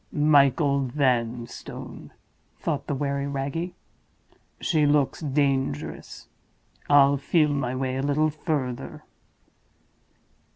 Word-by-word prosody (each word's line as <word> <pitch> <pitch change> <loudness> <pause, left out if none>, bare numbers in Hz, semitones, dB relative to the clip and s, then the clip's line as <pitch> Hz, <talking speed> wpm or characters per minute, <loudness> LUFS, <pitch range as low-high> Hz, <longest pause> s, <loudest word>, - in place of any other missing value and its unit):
"Michael 140 -1 +3
Vanstone!" 120 -3 -3 0.5
thought 145 -4 -3
the 145 - -1
wary 140 0 -2
Wragge. 140 +6 -3 0.9
"She 155 -4 +2
looks 145 -2 +2
dangerous; 135 - -2 0.6
I'll 140 -1 +6
feel 150 +2 +2
my 135 -3 -1
way 130 0 -2
a - - -1
little 150 +2 +1
further." 145 -5 -4
140 Hz, 90 wpm, -25 LUFS, 130-150 Hz, 0.9 s, I'll